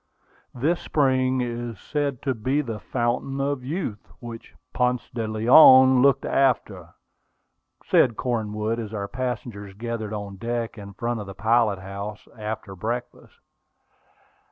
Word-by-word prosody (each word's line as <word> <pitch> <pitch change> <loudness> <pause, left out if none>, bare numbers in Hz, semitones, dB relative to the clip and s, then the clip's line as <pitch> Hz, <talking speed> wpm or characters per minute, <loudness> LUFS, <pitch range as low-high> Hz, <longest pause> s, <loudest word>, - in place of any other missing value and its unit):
"This 155 +8 +1
spring 130 -3 +1
is 120 -2 -4
said 145 -4 -3
to 135 - 0
be 130 +6 0
the 115 -6 -5
Fountain 125 +4 -2
of 140 -1 -1
Youth, 135 - -4
which 115 -1 -10 0.2
Ponce 125 -1 0
de 115 -2 -2
Leon 130 +3 +7
looked 140 0 +4
after," 105 -10 0 0.9
said 120 -3 +3
Cornwood, 110 -2 -2
as 110 -1 -5
our 100 -1 -3
passengers 115 -5 -5
gathered 115 -1 -4
on 100 -2 -6
deck 115 +1 -3
in 100 -2 -10
front 120 +3 -2
of 105 - -7
the 95 - -8
pilot 110 -1 +2
house, 100 +2 -7
after 105 -3 -6
breakfast. 120 +5 -5
115 Hz, 130 wpm, -24 LUFS, 105-130 Hz, 0.9 s, Leon